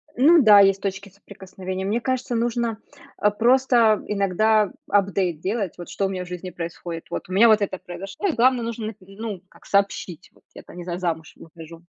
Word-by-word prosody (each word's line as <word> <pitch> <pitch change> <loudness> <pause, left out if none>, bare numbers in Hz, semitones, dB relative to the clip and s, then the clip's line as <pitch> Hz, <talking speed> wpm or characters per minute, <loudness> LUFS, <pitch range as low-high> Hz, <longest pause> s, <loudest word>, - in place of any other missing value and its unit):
Ну 315 +7 +6
да, 210 -5 +8
есть 195 -1 +4
точки 200 0 -4
соприкосновения. 190 -1 -8
Мне 220 +4 -1
кажется, 255 -1 -2
нужно, 235 -1 -1 0.4
а, 210 - +3
просто 235 -1 +3
иногда 210 +1 +2 0.2
апдейт 195 -4 +1
делать, 195 +1 -2
вот 175 - -9
что 200 - -2
у - - -1
меня 185 -1 -4
в - - -14
жизни 180 +1 -6
происходит. 170 -1 -7
Вот - - -6
у - - -5
меня 225 +5 +6
вот 215 -1 +5
это 190 -1 -2
произошло, 195 - -6
и 350 - 0
главное, 250 0 +3
нужно 230 -1 -4
нап 220 - -6
ну, 195 0 -7
как - - -21
сообщить: 195 -4 -1
"Вот - - -27
я - - -12
там - - -14
не 175 - -6
знаю, 175 0 -5
замуж 160 -3 -3
выхожу". 165 0 -13
200 Hz, 200 wpm, -23 LUFS, 180-225 Hz, 0.4 s, да